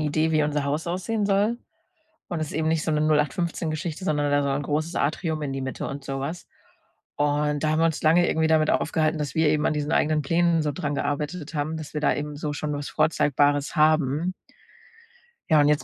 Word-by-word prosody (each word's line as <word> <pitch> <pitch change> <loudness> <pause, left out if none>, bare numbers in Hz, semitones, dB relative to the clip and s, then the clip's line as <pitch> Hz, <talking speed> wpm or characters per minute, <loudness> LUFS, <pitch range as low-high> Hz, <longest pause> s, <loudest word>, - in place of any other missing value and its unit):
Idee, 155 +1 +1
wie 155 -1 +3
unser 150 -1 0
Haus 145 +4 -2
aussehen 190 +5 -1
soll. 205 +4 +1 0.7
Und 175 -4 -3
es 155 - -2
ist - - -8
eben 155 +1 0
nicht 160 -1 0
so - - 0
'ne 150 - +1
08/15- 155 +2 0
Geschichte, 160 +3 -4
sondern 145 -4 0
da 145 0 +3
soll 140 -1 0
ein 145 - -3
großes 155 +4 -2
Atrium 155 +1 -1
in 140 -2 -3
die 135 - -3
Mitte 130 - -4
und 140 0 -6
sowas. 135 +5 -4 0.7
Und 145 0 0
da 155 - +2
haben 155 - +1
wir 165 - +4
uns 160 -2 -2
lange 165 +3 +4
irgendwie 160 0 +1
damit 155 -1 +3
aufgehalten, 160 0 +1
dass 145 -3 -3
wir 160 -1 +3
eben 150 0 +2
an - - +2
diesen 150 +1 -2
eigenen 155 -1 +2
Plänen 165 +2 +2
so 150 - -1
dran 145 +1 -3
gearbeitet 150 +3 -3
haben, 155 +2 -2
dass 155 -1 -8
wir 150 - -1
da 150 - +3
eben 150 0 -4
so 150 0 -3
schon 150 0 -3
was 145 0 -4
Vorzeigbares 145 -1 +1
haben. 155 +2 +2 1.2
Ja, 155 - +6
und 145 - +4
jetzt 150 0 +2
155 Hz, 220 wpm, -25 LUFS, 145-160 Hz, 1.2 s, Ja